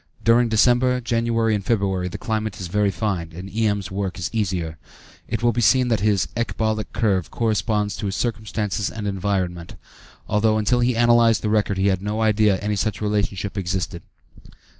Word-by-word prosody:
During 115 +1 +4
December, 125 +3 +3
January, 115 -1 0
and 105 -2 -1
February, 95 -4 0
the 90 - -6
climate 110 -4 -3
is 90 - -4
very 105 +2 +2
fine, 95 -5 -2
and 90 +2 -7
E.M.'s 105 -3 -1
work 95 -1 -3
is 85 -2 -3
easier. 90 -7 -2 0.5
It - - -3
will 120 - +4
be 120 - 0
seen 125 +2 +4
that 115 - +2
his 100 -3 +1
ecbolic 110 -2 -2
curve 95 -7 0
corresponds 110 -2 0
to 105 - -3
his 95 - -3
circumstances 110 -3 -2
and 110 -2 -6
environment, 95 -3 -2 0.5
although 110 +1 +2
until 110 +3 +2
he 120 0 +2
analyzed 120 -1 +4
the 105 - 0
record 105 -2 +1
he 95 +1 +2
had 95 -1 0
no 105 +2 -3
idea 105 -1 +3
that 95 - -4
any 105 0 0
such 105 +1 -1
relationship 105 -2 -1
existed. 90 -2 -3
105 Hz, 180 wpm, -22 LUFS, 95-115 Hz, 0.5 s, During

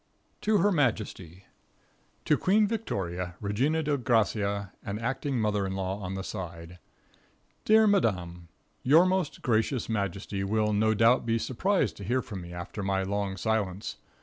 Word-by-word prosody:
To 215 0 +3
Her 205 +1 +3
Majesty. 105 - -1 0.8
To 150 - +4
Queen 210 +7 +3
Victoria, 90 - -3
Regina 130 +11 0
Dei 145 -1 +1
Gracia 105 -5 0
and 100 +1 -4
acting 135 +2 -2
mother 105 -2 +1
in 95 - -4
law 95 +1 -2
on 95 -1 -5
the 95 - -4
side: 85 -3 -7 0.9
Dear 220 +1 +6
Madame. 90 - +1 0.3
Your 155 +7 +6
most 185 -5 -1
gracious 115 +2 +1
majesty 100 -2 -2
will 105 +1 +1
no 110 +1 +2
doubt 115 +3 +4
be 115 0 +2
surprised 185 - 0
to 100 - -8
hear 125 +5 0
from 100 -4 -7
me 85 0 -9
after 90 +4 -6
my 95 0 0
long 100 0 -2
silence. 100 -1 -2
105 Hz, 150 wpm, -28 LUFS, 95-130 Hz, 0.9 s, Dear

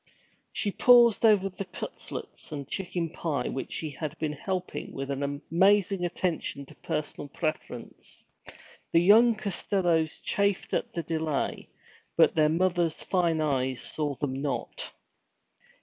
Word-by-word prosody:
She 205 - -1
paused 240 0 +6
over 205 -3 +4
the 195 +1 -6
cutlets 180 - -8
and 145 -2 -5
the - - -29
chicken 175 -3 -2
pie, 150 -7 -2
which 135 - -4
she 155 -2 -3
had 155 +2 -5
been 155 -2 -2
helping 185 +4 -4
with 135 0 -4
an 140 0 -3
amazing 180 +7 +2
attention 170 -5 -2
to - - -15
personal 145 -1 -4
preference. 145 -5 -5 0.7
The 165 - +5
young 220 +6 +6
Costellos 180 -6 0
chafed 200 -1 0
at - - -1
the 170 - -2
delay, 160 -2 -2 0.5
but - - +6
their 155 -1 +4
mother's 175 -1 +1
fine 170 -4 +1
eyes 130 -4 0
saw 150 -2 -2
them 135 0 -3
not. 145 -1 -3
165 Hz, 135 wpm, -28 LUFS, 145-190 Hz, 0.7 s, paused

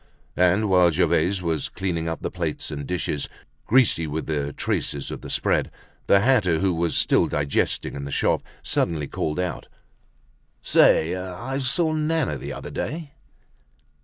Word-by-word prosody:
And 90 +4 +3
while 90 -2 +5
Gervaise 90 +3 +1
was 80 -3 -1
cleaning 85 -4 -2
up 80 - -5
the - - -2
plates - - -3
and 70 -2 -5
dishes, 85 -5 -2 0.4
greasy 110 -10 +3
with 75 +2 -3
the 75 -2 -2
traces 70 -1 -2
of - - -6
the - - -8
spread, - - +1 0.4
the 100 - +5
hatter, 105 -9 +3
who 95 +1 +1
was 85 0 0
still - - +3
digesting 70 -1 0
in 70 -1 -5
the 70 - -6
shop, - - +1 0.2
suddenly 80 -3 0
called 75 +3 -3
out: 90 -2 -3 1.0
"Say, 80 +3 +4
I 95 +9 -4
saw 155 +5 +1
Nana 155 -2 0
the - - -6
other - - -7
day." 155 -2 -4
90 Hz, 155 wpm, -24 LUFS, 80-110 Hz, 1.0 s, while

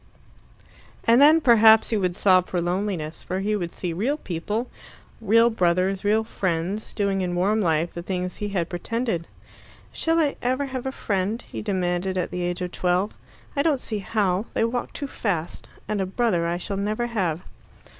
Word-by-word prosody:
And 235 +3 +5
then 310 +3 +7
perhaps 225 -4 +6
he 220 - +2
would 180 -3 0
sob 185 -2 +4
for 180 - -1
loneliness, 175 -2 -2
for 185 - -3
he 210 +2 0
would 175 -4 -3
see 175 -3 -4
real 240 - 0
people 210 - -3 0.5
real 230 +2 +4
brothers, 185 -1 +1
real 215 +2 +3
friends 190 -1 -3
doing 200 -2 0
in 175 -1 -2
warm 205 +5 +2
life 165 -2 +1
the 170 - -5
things 180 0 -3
he 205 - -3
had 180 -5 -1
pretended. 180 0 -2 0.7
"Shall 325 0 +1
I 295 -3 +1
ever 260 +3 0
have 260 -1 -5
a - - -1
friend?" 205 -2 -1
he - - -7
demanded 185 -2 -1
at 180 - -1
the 180 - -3
age 175 +1 -2
of 180 - -4
twelve. 180 +3 0 0.4
"I 280 - +2
don't 295 -3 +2
see 215 -4 -4
how. 200 0 0
They - - +2
walk 240 +2 -2
too 285 - -5
fast. 180 - -3 0.2
And 210 -2 -1
a 190 - -1
brother 190 -5 +1
I 170 +1 -1
shall 195 +2 -4
never 215 +4 -1
have." 185 -9 -1
195 Hz, 185 wpm, -24 LUFS, 180-225 Hz, 0.7 s, then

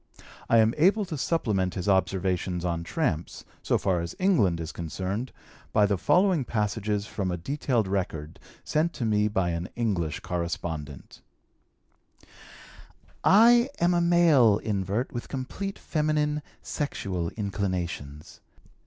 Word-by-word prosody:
I 115 - +5
am 110 0 +4
able 195 +7 +4
to 165 - -5
supplement 105 - 0
his 95 0 -4
observations 95 -1 0
on 85 -1 -1
tramps, 85 - -2 0.2
so - - +1
far 95 -3 0
as 85 +1 -6
England 110 - +2
is 80 -1 -5
concerned, 95 +8 -4 0.4
by 105 -1 +4
the 100 0 +1
following 180 - +3
passages 105 -2 -1
from 100 -3 -3
a 90 - -2
detailed 120 - -1
record 80 -5 -3 0.2
sent 160 +3 0
to 120 - -3
me 105 -1 +2
by 95 -4 0
an 85 +1 -4
English 95 -10 -1
correspondent: 80 -4 -5 2.0
"I 235 +5 +6
am 175 +1 +3
a 175 - +2
male 165 -11 +5
invert 105 +3 -2
with 120 - -5
complete 165 +9 -5
feminine, 150 -1 0 0.2
sexual 95 - -3
inclinations. 90 -8 -4
105 Hz, 125 wpm, -27 LUFS, 90-150 Hz, 2.0 s, I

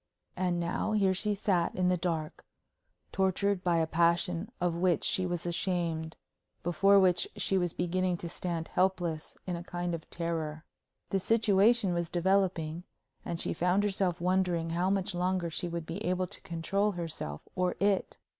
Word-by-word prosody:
And 180 -2 0
now, 170 +5 -1
here 195 -3 +3
she 210 +2 0
sat 190 -3 +1
in 185 -1 +1
the 180 - +3
dark, 165 -3 -3 0.7
tortured 190 0 +1
by 175 -2 +2
a 165 - +3
passion 170 +3 +1
of 175 -1 +1
which 170 -2 +1
she 185 -1 +1
was 175 -1 -3
ashamed, 170 -2 -1 0.5
before 195 +4 +5
which 180 -2 +3
she 195 - 0
was 175 -2 +1
beginning 180 0 0
to 170 - -6
stand 170 -1 -4
helpless 175 -4 0
in 180 - -2
a 170 - -6
kind 175 0 -3
of 165 -1 -6
terror. 165 -2 -3 0.5
The 195 - +2
situation 215 0 +3
was 170 -1 -1
developing, 175 -3 +1 0.4
and 170 - -4
she - - -1
found 180 +4 +2
herself 190 -4 0
wondering 175 -2 +1
how 175 +3 +1
much 195 0 0
longer 180 -1 0
she 175 - -2
would 170 -1 -4
be 170 +6 -5
able 185 +1 0
to - - -10
control 195 +5 0
herself 160 - -5
or 180 -1 +1
it. 200 -1 +1
175 Hz, 165 wpm, -30 LUFS, 170-190 Hz, 0.7 s, before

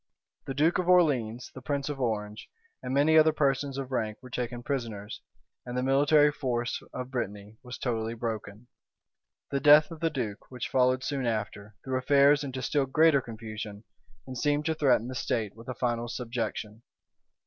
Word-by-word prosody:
[*] - - -52
The 135 - -4
duke 160 +6 +3
of 180 0 -1
Orleans 130 -10 +2
the 130 - -9
prince 140 +1 -2
of 145 -2 -4
Orange, 105 -3 -3 0.3
and 125 - -5
many 150 +4 +5
other 155 0 +5
persons 140 -2 0
of 135 -1 -5
rank 110 -4 -2
were 130 - -11
taken 120 -1 -4
prisoners; 115 -7 -4 0.4
and 125 0 -5
the 125 - 0
military 145 +3 +4
force 125 -4 -2
of 125 0 -6
Brittany 105 -3 -5
was 125 -1 -8
totally 115 -2 -2
broken. 110 -1 -5 0.9
The 140 - 0
death 150 +3 +7
of 165 - -8
the 165 0 +1
duke, 120 -8 -5
which 125 -2 -5
followed 130 0 +2
soon 135 -4 -2
after, 105 -2 -4
threw 130 -1 -1
affairs 140 +2 +4
into 130 -2 -5
still 140 -2 +1
greater 155 +1 +4
confusion, 110 -2 -8 0.4
and 130 - -7
seemed 145 +4 0
to 160 - +1
threaten 130 -7 +2
the 130 - -5
state 110 -4 -2
with 115 +1 -13
a 130 - -4
final 120 -1 -1
subjection. 115 -3 -4
125 Hz, 180 wpm, -28 LUFS, 115-140 Hz, 0.9 s, death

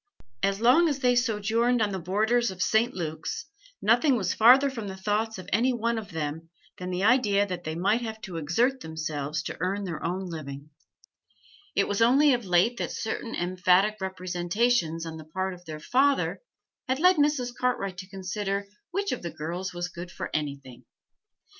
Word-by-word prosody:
As 195 0 +1
long 260 +9 +5
as 285 - -1
they 250 -2 +2
sojourned 235 +1 +1
on 210 -2 +1
the 190 - -3
borders 220 +7 +1
of 190 -1 -8
St. 235 +3 +2
Luke's, 160 - -4 0.4
nothing 245 +5 +4
was 190 -6 0
farther 260 +5 +6
from 225 -6 -6
the 190 -1 -6
thoughts 210 +3 -1
of 185 - -9
any 245 +5 +3
one 235 -1 0
of 215 - -9
them 160 0 -4 0.3
than 180 0 -5
the 180 +1 -2
idea 210 -4 +4
that 180 -3 -6
they 155 0 -3
might 200 +7 +1
have 220 -2 -5
to 180 -6 -6
exert 230 - +1
themselves 155 - -4
to - - -5
earn 195 +4 -1
their 170 -5 -5
own 185 +3 -2
living; 150 -4 -7 1.0
it 200 - +2
was 205 +2 -1
only 270 +5 +5
of 240 -3 -1
late 185 +7 +3
that - - -2
certain 225 0 -4
emphatic 185 +3 +2
representations 180 -1 0
on 160 -1 -6
the 155 - -10
part 190 +4 -3
of 180 0 -14
their 155 -2 -7
father 270 - +1 0.5
had 260 +1 +1
led 360 +4 +5
Mrs. 290 -5 +1
Cartwright 200 -6 -1
to 185 0 -9
consider 195 +1 -3 0.2
which 400 +3 -2
of - - -3
the 170 - -4
girls 165 +4 -4
was 175 0 -3
good 175 0 -8
for - - -6
anything. 140 -4 -4
195 Hz, 185 wpm, -27 LUFS, 175-240 Hz, 1.0 s, farther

